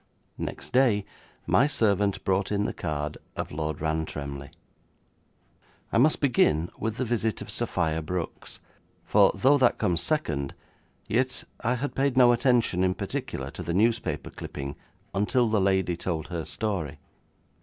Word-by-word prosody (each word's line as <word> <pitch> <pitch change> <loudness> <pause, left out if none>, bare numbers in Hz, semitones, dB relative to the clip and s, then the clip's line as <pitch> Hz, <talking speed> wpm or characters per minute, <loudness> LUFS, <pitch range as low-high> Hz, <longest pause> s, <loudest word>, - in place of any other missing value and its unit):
Next - - -5
day 120 -6 +4 0.4
my 140 - +4
servant 100 -7 +1
brought 95 +1 +1
in 105 0 +1
the - - -2
card 75 -1 -3 0.2
of - - -4
Lord 75 -1 -3
Rantremly. 75 -3 -3 1.4
I - - +4
must 150 +5 +4
begin 85 - +2
with 110 0 -2
the 130 - -1
visit 110 -3 0
of - - -6
Sophia 80 0 0
Brooks, 85 +2 -5 0.5
for - - +5
though 140 +2 +4
that 125 -2 +4
comes 85 -2 +1
second, 75 - -1 0.5
yet 125 +3 0 0.2
I 125 +2 +2
had 140 +4 -3
paid 135 -1 +1
no 125 -2 +7
attention 120 -6 +2
in 95 0 +2
particular 65 +1 -4
to 85 - -7
the 85 0 -2
newspaper 115 +3 +1
clipping 70 +1 -6 0.4
until 110 +5 +2
the 110 -2 +2
lady 95 -2 +2
told 85 -2 -3
her 85 -3 -3
story. 90 - -3
100 Hz, 145 wpm, -27 LUFS, 80-120 Hz, 1.4 s, no